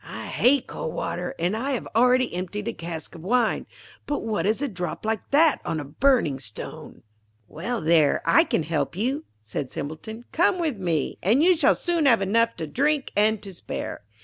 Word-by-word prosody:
I - - -7
hate 265 +1 +3
cold 160 - -5
water, 170 +1 -3
and 175 +5 0
I 265 +5 -1
have 245 - -3
already 250 0 +4
emptied 190 +4 -4
a 230 - -1
cask 165 -3 -7
of 165 - -10
wine; 230 +5 +1 0.4
but 290 - -2
what 215 -3 -1
is 215 +3 +1
a - - +1
drop 180 -3 -5
like 220 -2 -2
that 305 +2 +4
on 160 - -2
a 145 - -5
burning 160 - +2
stone?' 110 -5 -9 0.4
'Well, 230 +10 -4
there 155 -2 +4
I 165 - +5
can - - 0
help 160 +1 -2
you,' 260 - -1 0.2
said 120 +5 -5
Simpleton. 220 +11 -6
'Come 345 +3 +3
with 315 -9 -1
me, 165 -6 -1
and 235 - +3
you 360 +1 +6
shall 305 -4 +4
soon 340 -4 +1
have 230 -6 +5
enough 230 +4 +2
to 160 - -4
drink 280 - 0
and 215 0 +2
to 195 -2 -8
spare.' 170 - -6
215 Hz, 195 wpm, -25 LUFS, 170-255 Hz, 0.4 s, you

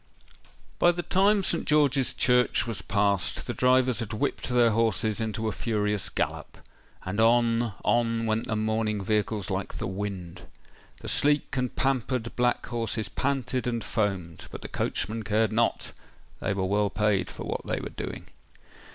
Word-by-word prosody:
By 175 - +6
the 175 0 -4
time 200 +3 +3
St. 170 - +1
George's 145 -3 +3
Church 125 -2 +3
was 115 -3 -2
passed, 100 -3 +1
the - - -3
drivers 125 -1 +3
had 115 -2 -4
whipped 110 - -2
their 120 -2 +4
horses 110 0 +1
into 110 0 -2
a - - 0
furious 105 -3 -1
gallop;—and 95 +3 -6
on—on 115 0 +2
went 110 0 -1
the 110 - -1
mourning 110 -1 -1
vehicles 105 0 -1
like 95 +1 -3
the - - -3
wind. 95 -3 -5 0.5
The - - -8
sleek 145 -1 +3
and 125 -2 -2
pampered 130 -3 -1
black 125 0 +1
horses 115 -2 -2
panted 130 -2 -1
and 120 -2 -1
foamed; 95 -5 -2
but - - -8
the - - -5
coachmen 110 +4 -2
cared 110 +1 +1
not—they 110 -2 -3
were 95 -1 -1
well 100 +2 +1
paid 105 -1 +1
for - - -8
what - - -4
they - - -1
were - - -6
doing. - - -6
115 Hz, 150 wpm, -27 LUFS, 105-125 Hz, 0.5 s, By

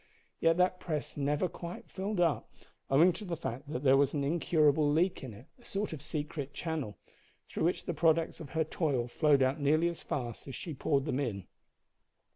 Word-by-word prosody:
Yet 165 0 +3
that 180 0 +2
press 155 -4 -4
never 145 +4 +1
quite 175 0 -8
filled 195 +1 -3
up, 170 -3 +1 0.4
owing 165 +7 +5
to 210 - -8
the 175 -4 -3
fact 140 -1 -5
that 130 -1 -3
there 135 -1 +6
was 140 +1 +3
an 140 - 0
incurable 155 -1 +3
leak 175 +3 +1
in 130 - -6
it 110 +5 -12
a - - -20
sort 200 -4 -3
of 150 - -7
secret 145 -1 -4
channel 155 - -3 0.5
through - - -2
which 175 - 0
the 175 - -2
products 165 +1 +2
of 150 - -8
her 160 - +4
toil 145 -6 -1
flowed 140 +1 +3
out 130 +3 +1
nearly 155 +4 +3
as 170 - -7
fast 120 -3 -4
as 135 - -6
she 165 - -5
poured 140 0 0
them 140 -3 -1
in. 105 -9 -3
150 Hz, 200 wpm, -31 LUFS, 140-170 Hz, 0.5 s, there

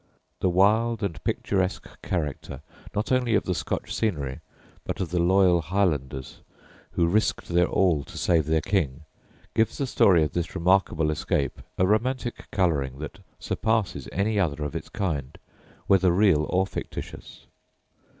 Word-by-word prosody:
The 95 - +2
wild 110 +5 +3
and 85 -6 -3
picturesque 95 -2 -1
character 75 -5 -3 0.3
not 105 +4 -1
only 125 -3 +2
of - - +2
the 90 - -1
Scotch - - -3
scenery, 75 - -2 0.4
but - - -4
of 90 -3 -3
the 90 - +1
loyal 90 0 +4
Highlanders, 75 -7 -1 0.5
who 85 - +2
risked 105 +6 0
their 90 +1 +3
all 85 -7 +2
to - - -11
save 80 -4 +2
their 80 0 +2
King, 80 -8 -1 0.5
gives 110 0 +1
the 140 - -1
story 90 -8 +4
of 75 - -1
this 85 0 -3
remarkable 85 -3 +2
escape 75 -2 -1 0.2
a 95 - +3
romantic 120 +4 -1
colouring 75 -9 0
that 75 +6 -7 0.2
surpasses 110 - -1
any 105 +3 0
other 75 -5 0
of 75 - -4
its - - -5
kind, 75 -9 -3 0.5
whether 95 -2 +4
real 90 -5 +3
or 95 +1 +2
fictitious. - - -8
90 Hz, 150 wpm, -26 LUFS, 75-100 Hz, 0.5 s, loyal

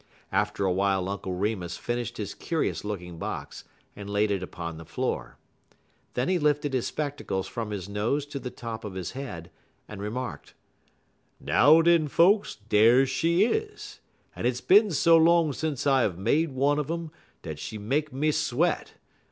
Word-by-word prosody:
After 105 +1 0
a 95 - +2
while 95 0 +1
Uncle 95 -1 -4
Remus 95 -3 -2
finished 120 -2 -3
his - - -4
curious - - -2
looking 90 -5 -6
box - - -6 0.3
and 100 -1 -8
laid 105 +1 +1
it 100 -2 0
upon 85 -2 -6
the 80 - -9
floor. - - -3 0.8
Then 125 +1 0
he 185 -1 +2
lifted 145 -2 +1
his 130 -2 0
spectacles 145 -10 -3
from 115 -2 -5
his 100 -3 -5
nose 110 +8 -1
to 145 -1 -6
the 130 - -5
top 115 -2 -7
of 100 -3 -7
his 90 -3 -4
head, 125 -12 -7 0.4
and 105 -2 -8
remarked: 120 +5 -5 0.8
"Now, 155 +6 +5
den, 170 -2 +4
folks, 195 +8 +3
dar 110 +5 +4
she 165 +8 +2
is, 430 - -3 0.4
en - - -4
hit's 125 0 +1
bin 210 +3 +5
so 165 0 +5
long 165 -2 +4
sence 150 -2 -3
I 135 -3 +4
uv 90 -4 -7
made 155 - +1
one 140 +3 +1
un 150 0 -3
um 165 -1 -4 0.3
dat 80 -2 -6
she 95 +7 -6
make 140 +9 -1
me 150 +4 +1
sweat. 155 +3 0
125 Hz, 170 wpm, -27 LUFS, 100-150 Hz, 0.8 s, Now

